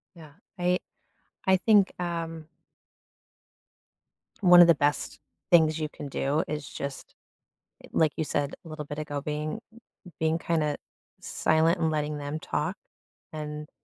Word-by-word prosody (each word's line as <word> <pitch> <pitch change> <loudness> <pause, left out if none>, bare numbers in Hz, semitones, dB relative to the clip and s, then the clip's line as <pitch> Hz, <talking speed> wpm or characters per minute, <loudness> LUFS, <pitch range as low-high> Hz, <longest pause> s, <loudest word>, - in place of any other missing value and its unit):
Yeah, 155 -4 -13 0.2
I 180 +1 +1 0.7
I 190 0 +5
think, 205 0 +4
um 165 -2 -4 1.9
one 180 -2 +9
of 175 - +9
the 170 - +6
best 145 +1 0 0.3
things 160 -2 +5
you 155 - -1
can 145 - -7
do 140 +2 0
is 150 -1 -4
just, 140 -1 -7 0.8
like 155 -2 +2
you - - 0
said 145 -1 -1
little 155 -2 -7
bit 145 +1 -6
ago, 145 -2 -4
being 150 +6 -3 0.6
being 160 0 +2
kinda 155 -3 0 0.4
silent 165 +3 +2
and 160 -1 +1
letting 150 -1 -1
them 145 +2 -4
talk - - -2 0.6
and 150 -1 -6
155 Hz, 130 wpm, -27 LUFS, 150-170 Hz, 1.9 s, one